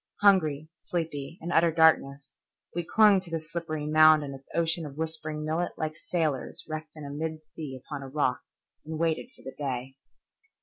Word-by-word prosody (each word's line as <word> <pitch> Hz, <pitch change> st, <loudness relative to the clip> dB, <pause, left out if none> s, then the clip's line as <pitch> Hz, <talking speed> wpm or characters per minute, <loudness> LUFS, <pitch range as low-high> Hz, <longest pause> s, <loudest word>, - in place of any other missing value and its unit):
Hungry, 160 Hz, -7 st, +4 dB
sleepy, 165 Hz, -2 st, -4 dB
in 170 Hz, +2 st, -4 dB
utter 170 Hz, 0 st, +5 dB
darkness, 155 Hz, -4 st, +3 dB, 0.4 s
we 175 Hz, -, -1 dB
clung 210 Hz, +2 st, +5 dB
to 185 Hz, -2 st, -11 dB
this 165 Hz, -1 st, -4 dB
slippery 155 Hz, -3 st, -3 dB
mound 155 Hz, 0 st, +6 dB
in 140 Hz, -1 st, -5 dB
its 135 Hz, 0 st, -12 dB
ocean 165 Hz, 0 st, +1 dB
of 145 Hz, -2 st, -8 dB
whispering 155 Hz, -1 st, -2 dB
millet 165 Hz, +3 st, -1 dB
like 155 Hz, 0 st, -2 dB
sailors 155 Hz, -5 st, -2 dB
wrecked 155 Hz, 0 st, -6 dB
in 145 Hz, -1 st, -7 dB
mid 160 Hz, -1 st, -3 dB
sea 145 Hz, -4 st, -8 dB
upon 145 Hz, -2 st, -5 dB
a 135 Hz, -, -7 dB
rock, 145 Hz, +2 st, 0 dB, 0.4 s
and 160 Hz, +1 st, -5 dB
waited 165 Hz, +7 st, 0 dB
for -, -, -19 dB
the 130 Hz, -, -7 dB
day. 135 Hz, -2 st, -4 dB
155 Hz, 175 wpm, -28 LUFS, 145-165 Hz, 0.4 s, mound